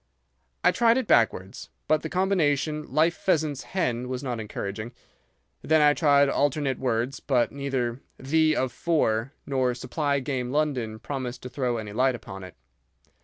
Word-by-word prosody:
I - - +6
tried 235 0 +3
it 260 - 0
backwards, 100 - +1 0.2
but 155 0 +3
the 160 - -5
combination 155 -5 0
'life 165 +2 +3
pheasant's 155 -6 0
hen' 125 -9 -2
was 130 +1 -4
not 125 -4 -3
encouraging. 110 +1 -5 0.7
Then 160 0 +3
I 150 -1 +6
tried 145 -2 +4
alternate 140 -1 0
words, 125 +1 -1
but 125 -4 +1
neither 135 -3 -2 0.2
'The 155 +3 +2
of 130 -1 0
for' 135 -7 0
nor 130 -3 0
'supply 140 +3 -1
game 130 -2 -3
London' 130 -7 -1
promised 125 +1 -5
to 125 - -6
throw 125 -3 -1
any 105 -2 -6
light 130 +3 +2
upon 95 -4 -9
it. 95 - -11
135 Hz, 155 wpm, -26 LUFS, 120-150 Hz, 0.7 s, I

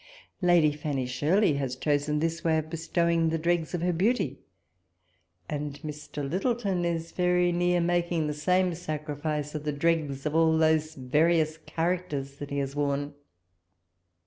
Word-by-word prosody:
Lady 175 -4 +5
Fanny 145 -3 -3
Shirley 150 +9 +2
has 135 -2 -2
chosen 145 +2 0
this 165 +2 -1
way 160 -1 +3
of 155 0 -3
bestowing 165 0 +1
the 165 - 0
dregs 170 +1 0
of 170 - -3
her 180 0 +1
beauty; 175 - 0 1.1
and 145 -1 -4
Mr. 150 -1 -5
Lyttelton 195 - 0
is 165 -1 -2
very 180 0 +2
near 175 0 +2
making 170 -1 +1
the 150 - -1
same 180 +4 +1
sacrifice 150 -2 -4
of 155 -1 -4
the 150 - -1
dregs 145 -2 0
of 150 - -1
all 160 0 +4
those 155 -1 +2
various 155 +4 +2
charac 180 +2 -1
ters 140 -1 -5
that 145 -1 -7
he 140 - -3
has 140 -1 -2
woxm. 145 0 -1
160 Hz, 155 wpm, -28 LUFS, 145-175 Hz, 1.1 s, Lady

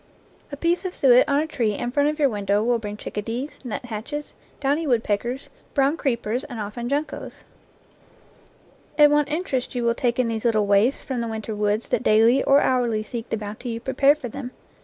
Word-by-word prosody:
A 285 - -6
piece 340 +4 +1
of 370 -1 -4
suet 255 +1 +5
on 285 +1 +3
a - - -1
tree 235 -9 -1
in 240 +3 -3
front 285 +2 +2
of 305 - -3
your 295 -3 +4
window 205 -3 0
will 240 0 +2
bring 210 -1 -6
chicka 210 0 -5
dees, 245 +7 -5
nuthatches, 245 +4 -5 0.3
downy 290 +3 0
woodpeckers, 240 +1 -1 0.3
brown 280 +1 +3
creep 260 -7 -1
ers, 235 +5 -1
and 235 - -7
often 215 +4 -4
juncos. 290 +2 -4 1.5
And 295 -1 +7
what 295 -1 +2
interest 295 -6 -2
you 245 - -1
will 235 0 +3
take 240 0 -1
in 250 -2 +2
these 225 -1 -3
little 220 -3 +2
waifs 205 +6 +3
from 255 -3 -3
the 230 - -2
winter 220 0 -4
woods 210 +2 0
that - - +1
daily 230 +3 +4
or 275 +1 +5
hourly 240 -4 +1
seek 230 +1 -6
the - - -1
bounty 215 +4 -6
you 230 0 -3
prepare 270 +4 +3
for 300 -5 -7
them 250 +2 -6
245 Hz, 200 wpm, -23 LUFS, 220-280 Hz, 1.5 s, And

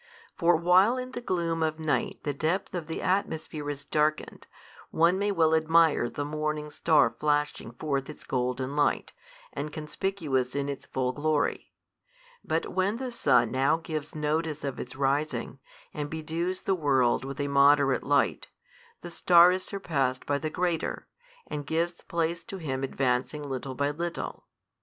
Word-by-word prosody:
For 170 +1 +4
while 185 +8 +4
in 255 0 -5
the 250 - -5
gloom 170 -6 -1
of 155 -1 0
night 155 -2 -1
the 145 - -1
depth 160 +7 -1
of 170 -4 -4
the 160 - -4
atmosphere 160 -5 -1
is 140 -1 -5
darkened, 150 +1 -1 0.4
one 170 +3 +3
may 205 0 +1
well 160 -4 +3
admire 160 -5 +4
the 145 - -4
morning 150 0 -3
star 155 -1 +3
flashing 150 -4 0
forth 140 +1 -2
its - - -9
golden 130 +2 -2
light, 145 -1 +1 0.4
and 150 - -4
conspicuous 150 -5 -2
in 140 0 -1
its 140 - -6
full 125 -1 -1
glory: 150 +2 -1 0.7
but 160 - -2
when 190 +4 +1
the 255 0 -4
sun 120 - +3
now 135 +4 +2
gives 155 -2 -5
notice 155 0 -1
of 140 -2 -4
its 125 - -7
rising, 140 +3 -1 0.3
and 145 -1 -4
bedews 165 +4 -3
the 195 - +1
world 135 -8 +2
with 135 +1 -6
a 145 - 0
moderate 140 -1 +4
light, 145 +1 +1 0.5
the 175 - -8
star 175 +1 +6
is 185 0 -1
surpassed 140 -10 -2
by 145 0 0
the 155 - -2
greater, 175 0 -2 0.4
and 145 -1 -5
gives 165 +2 0
place 170 0 -2
to 195 - -7
him 135 -6 -3
advancing 135 +2 -1
little 130 0 -4
by 145 +2 0
little. 170 +3 -5
155 Hz, 160 wpm, -28 LUFS, 140-170 Hz, 0.7 s, star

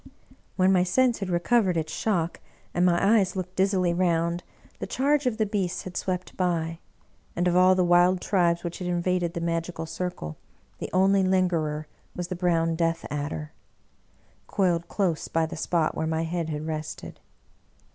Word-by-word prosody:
When 185 0 +4
my 180 - +4
sense 240 +6 +2
had 195 -2 -3
recovered 180 +1 +2
its 160 -1 -2
shock, 175 -6 -1 0.3
and 175 - +1
my 195 +5 +4
eyes 190 -2 -1
looked 185 -1 -5
dizzily 190 -2 +2
round, 170 -1 +1 0.4
the - - -4
charge 285 +1 +1
of 230 -3 0
the 220 - +2
beasts 195 -4 -2
had 185 -1 -8
swept 185 -1 -3
by; 165 -2 -1 0.6
and 175 +1 +1
of 175 - +2
all 185 +1 +6
the 185 - +3
wild 175 +1 +4
tribes 175 -3 +1
which 170 -1 -5
had 180 - -4
invaded 175 0 0
the 170 - -2
magi 165 +1 -1
cal 165 -1 -6
circle, 160 - -5 0.4
the - - -4
only 195 +1 +4
lingerer 175 -5 +1 0.3
was 180 -1 -4
the 185 - -3
brown 165 -2 +1
Death 165 0 0
adder, 150 +1 -4 1.0
coiled 175 -4 +1
close 180 -6 -1
by 165 0 +1
the 165 +1 -6
spot 165 0 0
where 160 - -2
my 160 0 0
head 165 0 -2
had 150 0 -4
rested. 155 -1 -6
175 Hz, 175 wpm, -26 LUFS, 165-185 Hz, 1.0 s, all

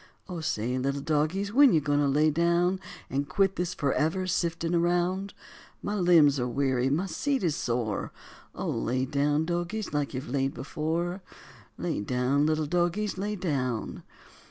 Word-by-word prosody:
O 180 -2 -5
say, 125 -4 -1
little 140 +2 -1
dogies, 160 +8 0
when 275 -3 +7
you 160 - +5
goin' 145 0 +1
to 145 - +2
lay 150 +3 +3
down 170 +3 +2 0.3
And 140 +1 -2
quit 195 -1 +2
this 175 -1 -2
forever 155 +5 0
siftin' 170 -2 -1
around? 175 +3 +1 0.5
My 205 - -2
limbs 170 -8 +5
are 125 - 0
weary, 130 0 +1
my 160 +7 +1
seat 275 +6 -1
is 165 -4 +1
sore; 115 -4 -2 0.4
Oh, - - -4
lay 130 +2 -1
down, 145 +3 +1
dogies, 175 +4 -3
like 145 -2 -1
you've 130 - -4
laid 135 +2 -1
before, 170 +5 -2 0.6
Lay - - -2
down, 125 +6 +1
little 155 0 +1
dogies, 180 +5 0
lay 210 +2 -2
down. 135 - -2
155 Hz, 155 wpm, -28 LUFS, 140-180 Hz, 0.6 s, when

